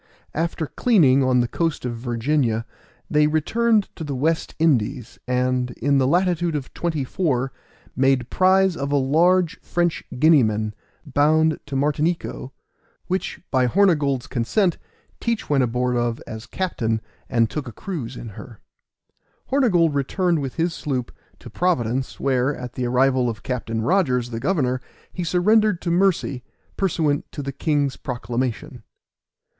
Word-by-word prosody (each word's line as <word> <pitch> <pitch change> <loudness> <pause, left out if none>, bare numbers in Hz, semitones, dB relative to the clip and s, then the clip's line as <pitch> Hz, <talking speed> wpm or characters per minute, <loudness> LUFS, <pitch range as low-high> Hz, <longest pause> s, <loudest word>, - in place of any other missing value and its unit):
After 165 0 -1
cleaning 145 - +3
on 130 -1 +3
the 120 - 0
coast 165 0 -2
of 120 -1 -2
Virginia, 120 0 0 0.4
they 150 0 +3
returned 210 +8 +2
to 160 - -6
the 145 -3 -4
West 160 +5 -1
Indies, 125 -5 0
and 125 0 0
in 140 +3 +2
the 130 - +2
latitude 175 0 +1
of 140 -3 -5
24, 145 -4 -1 0.4
made 130 -2 +2
prize 190 0 +4
of 140 -1 -3
a - - +2
large 170 +6 +3
French 175 -1 -1
Guineaman, 110 -8 +3 0.3
bound 155 +2 +2
to 140 - -5
Martinico, 150 0 -1 0.6
which, 185 +1 -3
by 130 -2 +3
Hornygold's 145 -6 +2
consent, 155 - 0 0.4
Teach 230 -8 -2
went 135 -3 +4
aboard 125 +1 0
of 120 -1 0
as 110 +2 -8
captain, 115 -13 -1 0.3
and 115 -1 +3
took 140 +5 -5
a - - -6
cruise 125 - -6
in 115 - -7
her. 105 +2 -11 0.9
Hornygold 185 - +3
returned 165 +4 0
with 135 -2 -5
his 170 0 0
sloop 130 -7 -3 0.3
to - - -13
Providence, 130 -8 -1
where, 135 +1 +1
at 125 -1 -7
the 125 -1 -2
arrival 130 0 +2
of 110 -2 -6
Captain 115 -3 -3
Rogers, 125 - +1
the 115 - -3
governor, 130 -3 0 0.3
he 180 - -3
surrendered 205 +3 +3
to 170 - -1
mercy, 175 -8 +1 0.3
pursuant 155 -6 0
to 145 - -5
the 140 - -3
king's 145 0 0
proclamation. 120 0 -4
140 Hz, 140 wpm, -22 LUFS, 125-170 Hz, 0.9 s, prize